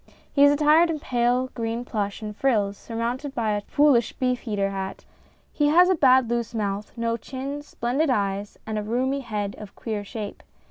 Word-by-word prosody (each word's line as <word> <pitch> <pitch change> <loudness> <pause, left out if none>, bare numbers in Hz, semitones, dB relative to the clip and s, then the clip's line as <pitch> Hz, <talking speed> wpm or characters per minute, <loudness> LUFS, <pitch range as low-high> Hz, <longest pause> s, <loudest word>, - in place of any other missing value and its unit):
He 280 - +5
is 285 - +8
attired 305 +3 +5
in 315 -2 -2
pale 250 0 +1
green 230 +1 -3
plush 205 -2 -3
and 210 -1 -5
frills, 210 -6 +1
surmounted 245 +6 -4
by 225 -3 0
a 205 0 0
foolish 255 0 +3
beej 250 -2 -1
eater 200 -1 0
hat. 195 0 -5 0.5
He 295 - +2
has 350 +5 +6
a - - +5
bad 260 -6 +5
loose 235 -1 -2
mouth, 205 -1 -2
no 230 0 0
chin, 275 +4 -6
splendid 280 +2 -1
eyes, 200 -3 -1
and 220 -1 -2
a - - -4
roomy 255 +5 0
head 210 -6 -3
of 210 -2 -10
queer 215 -3 -4
shape. 210 0 -7
235 Hz, 185 wpm, -25 LUFS, 210-270 Hz, 0.5 s, is